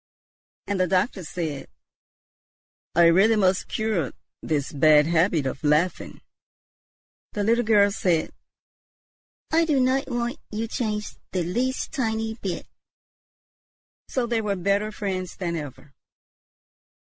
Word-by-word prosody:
And 200 -2 -2
the 185 - +3
doctor 190 +2 0
said, 155 -5 -4 1.3
"I 170 0 +6
really 195 +7 +5
must 190 -3 +2
cure 215 -10 -1 0.3
this 145 -3 -1
bad 150 +1 +5
habit 165 -2 +2
of 130 +2 -4
laughing." 155 +4 0 1.1
The 205 - -1
little 230 +3 +3
girl 205 -2 +4
said, 175 -5 0 1.2
"I 325 +1 +4
do 300 -4 +2
not 260 +2 +2
want 240 +3 -2
you 220 +2 -3
changed 215 -3 -3
the 180 -2 0
least 245 +9 -2
tiny 225 -5 -1
bit." 195 -6 -5 1.4
So 255 -2 -1
they 235 -1 0
were 205 -2 -1
better 200 +3 0
friends 190 -4 -4
than 170 -3 -3
ever. 145 -2 -8
200 Hz, 120 wpm, -25 LUFS, 170-225 Hz, 1.4 s, I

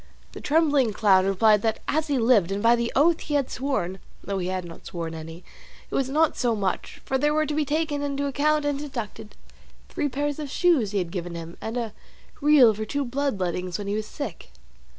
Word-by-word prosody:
The - - -9
trembling 290 -7 +2
clown 195 -3 +4
replied 210 +2 +4
that 220 0 0
as 315 +1 0
he 285 -2 +1
lived 225 -7 +3
and 200 +2 -2
by 230 +1 +6
the 235 0 -2
oath 320 +4 +4
he 295 - -3
had 280 -3 0
sworn 195 -9 -2 0.2
(though 200 -1 -3
he 180 - -2
had 185 -1 -3
not 165 -1 -11
sworn 165 -2 -5
any) 165 +2 -9 0.5
it - - -9
was 265 -1 0
not 310 +3 +2
so 240 -3 +1
much; 195 -3 -3
for 265 - 0
there 295 +2 +2
were 310 0 +2
to 300 - -3
be 300 0 0
taken 300 0 -1
into 285 0 -2
account 295 +2 +1
and 290 -1 0
deducted 235 -6 -6 0.5
three 290 - -1
pairs 290 +3 -2
of 295 -2 -5
shoes 305 - +2
he 205 - -2
had 175 -3 -2
given 175 -1 -5
him, 165 0 -7
and 225 +2 -4
a 230 -3 -3 0.5
real 280 -6 +6
for 215 +1 -4
two 280 +5 -2
blood 270 -3 -1
lettings 180 0 -2
when 205 - -6
he 200 - -2
was 215 0 -2
sick. 285 - -7
240 Hz, 220 wpm, -25 LUFS, 195-290 Hz, 0.5 s, by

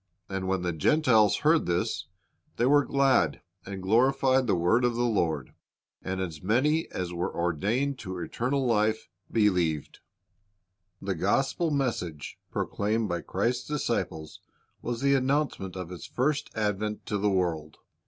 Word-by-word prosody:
And 95 -1 -3
when 95 -1 0
the 90 -1 -1
Gentiles 110 - +3
heard 160 +1 +4
this, 85 0 -1 0.5
they 120 - +2
were 145 +2 +5
glad, 135 - +2 0.2
and 95 -1 -6
glorified 130 +5 +3
the 100 - +3
word 90 +8 +2
of 120 -1 +2
the 120 - 0
Lord; 80 - 0 0.5
and 95 0 -3
as 85 -5 -4
many 140 - +1
as 90 -1 -4
were 85 +1 -2
ordained 105 - -1
to 95 -3 -6
eternal 125 - -1
life 110 -2 +1 0.2
believed."" 90 -9 +1 1.0
The 95 0 -1
gospel 135 - +1
message 115 - -2
proclaimed 105 +1 -1
by 85 -1 -2
Christ's 120 +9 -1
disciples 95 - -3 0.4
was 120 0 -3
the 140 0 +3
announcement 135 -8 0
of 90 -2 -5
His 90 -2 -8
first 140 +3 0
advent 105 0 -2
to 105 -1 -2
the 105 +1 +2
world. 85 -5 -1
105 Hz, 145 wpm, -28 LUFS, 90-130 Hz, 1.0 s, were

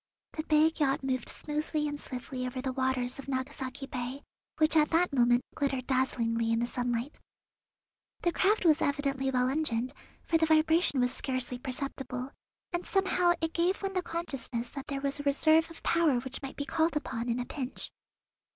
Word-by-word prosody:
The 310 - -3
big 310 +1 +3
yacht 275 -2 +2
moved 255 -3 0
smoothly 300 0 -1
and 290 0 -4
swiftly 255 0 -5
over 250 +1 -4
the 260 0 -2
waters 260 -1 -1
of 275 - -8
Nagasaki 265 0 -3
Bay, 260 +1 -5 0.3
which 310 0 +3
at 305 -1 +5
that 335 -1 +2
moment 240 -1 +4
glittered 270 -3 -1
dazzlingly 230 -3 +1
in 230 - +3
the 235 - +1
sunlight. 245 +2 -2 1.0
The 345 - +2
craft 390 +2 +2
was 315 -1 +5
evidently 275 -1 0
well 250 -1 +2
engined, 260 -3 0 0.3
for 325 - +2
the 320 - +3
vibration 315 -2 +4
was 250 +1 +1
scarcely 255 -2 -2
perceptible, 260 0 -4 0.4
and 350 +1 -1
somehow 365 -2 +3
it 325 0 -1
gave 360 +4 +1
one 390 0 -1
the 365 - +1
consciousness 275 -9 -4
that 275 0 -7
there 275 -2 -3
was 280 +1 -2
a - - -4
reserve 315 +3 +4
of 330 - -12
power 325 -7 +3
which 265 +1 -6
might 270 -1 -6
be 285 - -3
called 320 +2 +1
upon 240 -4 -3
in 235 +1 0
a 245 - -2
pinch. 260 -2 -4
275 Hz, 180 wpm, -30 LUFS, 255-315 Hz, 1.0 s, at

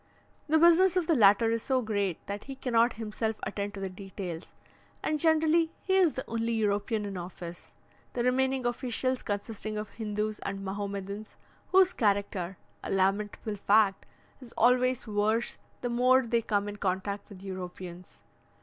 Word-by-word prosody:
The 315 +1 +4
business 345 +3 +6
of 360 - +2
the 330 - +3
latter 225 0 +5
is 230 0 0
so 260 0 0
great, 200 -5 -2
that 200 +1 -5
he 275 - -7
cannot 240 -2 +2
himself 220 0 -3
attend 205 0 -3
to - - -6
the 195 - -2
details, 185 -2 -7 0.6
and 305 -1 0
generally 320 +1 +3
he 380 - 0
is 370 -5 +4
the 260 - -5
only 230 0 -1
European 210 0 0
in 195 -2 -5
office, 175 -1 -8 0.4
the 240 - -1
remaining 260 +1 +1
officials 255 +1 -1
consisting 215 +1 -4
of 210 0 -4
Hindoos 210 0 -2
and 195 0 -5
Mahomedans, 200 +1 -5 0.4
whose 375 -1 +5
character 200 -4 0 0.3
a - - -5
lamentable 200 +2 0
fact 200 0 +3 0.3
is 240 -2 -12
always 250 +1 +3
worse 215 +2 0 0.2
the 245 - -2
more 250 +2 +4
they 235 0 +1
come 205 -2 0
in 205 0 -6
contact 200 +1 -2
with 195 -2 -12
Europeans. 180 -2 -8
215 Hz, 160 wpm, -29 LUFS, 200-250 Hz, 0.6 s, business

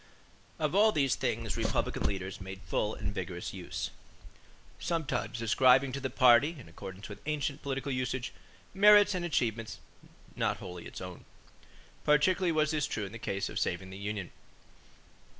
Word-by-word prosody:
Of - - 0
all 215 +2 +6
these 140 -8 +2
things - - -1
Republican - - -1
leaders 95 -1 -4
made 95 +1 -7
full 105 +1 -1
and 100 - -4
vigorous 90 -2 -5
use, 95 -2 -5 0.9
sometimes 130 -7 -2
ascribing 130 +3 +5
to 135 - -3
the 130 -1 -2
party, 130 +5 +5
in 125 - -12
accordance 95 +3 -9
with 105 - -10
ancient 150 -1 -1
political 140 0 -3
usage, 130 0 -2 0.4
merits 205 +1 +7
and 180 -1 -2
achievements 115 -9 -1 0.6
not - - 0
wholly 90 -1 -8
its - - -9
own. 90 -1 -8 0.8
Particularly 175 +5 +3
was 155 -1 +2
this 150 -2 0
true 105 - -3
in 95 - -8
the 115 - -8
case 100 -2 -2
of - - -3
saving 95 0 -2
the 95 - -8
union. 100 -3 -4
125 Hz, 155 wpm, -31 LUFS, 100-150 Hz, 0.9 s, merits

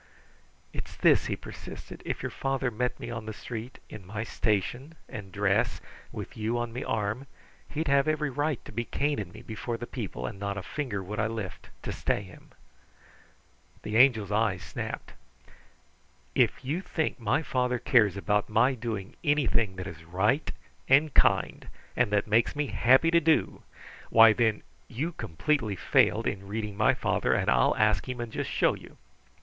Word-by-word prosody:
"It's - - -6
this," - - +4
he - - -1
persisted. - - -10
"If - - -4
your - - -3
father 135 -2 -1
met 125 +3 -2
me 120 - -6
on 115 -2 -6
the 110 - -4
street, 120 +3 -7
in 110 - -10
my 100 +4 -4
station 120 - -1
and 100 -3 -8
dress, 100 0 +1 0.3
with - - -7
you 110 +2 -1
on 120 -1 -3
me 125 - -4
arm, 110 +5 -2 0.4
he'd 155 +2 -2
have 140 +1 +3
every 155 -2 0
right 145 0 -1
to - - -9
be 115 +2 -2
caning 125 -8 -1
me 110 +4 -12
before 115 +1 -4
the 120 - -5
people, 105 - -5
and 95 - -6
not 100 0 -3
a 100 - -4
finger 115 -6 -3
would 105 +3 -5
I 110 - +2
lift 110 -4 -6
to - - -3
stay 105 - -1
him." 90 -2 -15 1.3
The 105 - -4
Angel's 115 -5 +5
eyes 105 -4 +1
snapped. - - -6 1.2
"If - - +2
you 155 +8 -1
think 160 -7 -2
my 120 +7 +1
father 125 -3 0
cares 110 -5 +3
about 105 +1 0
my 115 +5 +4
doing 110 -5 -5
anything 115 -9 +2
that 95 0 -5
is 85 -4 -8
right 100 - +1 0.4
and 140 +2 +5
kind, - - +2 0.3
and - - +2
that 105 -1 +2
makes 115 +5 +2
me 150 0 0
happy 135 +5 +4
to 170 - +6
do 160 0 +2 0.5
why, 115 -1 +8
then 110 -2 +1 0.2
you 150 +9 -3
completely 115 - -1
failed 85 - +3
in 100 0 -3
reading 105 0 -4
my 110 +1 +3
father, - - +1
and - - +1
I'll - - +3
ask 110 +3 +2
him 125 -1 -4
and 120 -1 -4
just - - -2
show - - +2
you." - - -12
115 Hz, 175 wpm, -28 LUFS, 105-130 Hz, 1.3 s, why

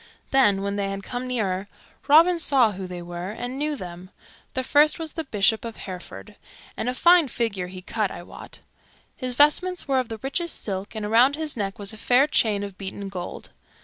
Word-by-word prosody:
Then, 205 -8 +4
when 200 0 -2
they 200 -1 -1
had 195 0 -5
come 250 +3 -4
nearer, 200 -6 -1 0.4
Robin 335 +4 +6
saw 265 -8 +4
who 190 -1 -6
they 180 -1 -7
were, 175 +1 -6
and 245 +5 -5
knew 300 0 -1
them. 180 -4 -9 0.5
The 260 - 0
first 295 +3 +4
was 325 -2 -5
the 325 -1 -4
Bishop 215 -1 +1
of 230 -1 -6
Hereford, 140 - -9 0.4
and 245 - -2
a 250 - -3
fine 345 +1 +5
figure 220 -7 -2
he 185 0 -10
cut, 215 0 -1
I 175 - -8
wot. - - -11 0.5
His 255 -2 -3
vestments 330 +6 +3
were 270 -2 +2
of 255 - -3
the 225 - -5
richest 335 +5 -2
silk, 195 +1 -5
and 215 -1 -3
around 240 +6 +4
his 310 -1 -1
neck 195 -3 -3
was 205 +1 -1
a - - -9
fair 250 +5 +4
chain 215 -8 +1
of 200 -2 -8
beaten 195 0 -5
gold. 180 -2 -7
225 Hz, 205 wpm, -24 LUFS, 195-275 Hz, 0.5 s, Robin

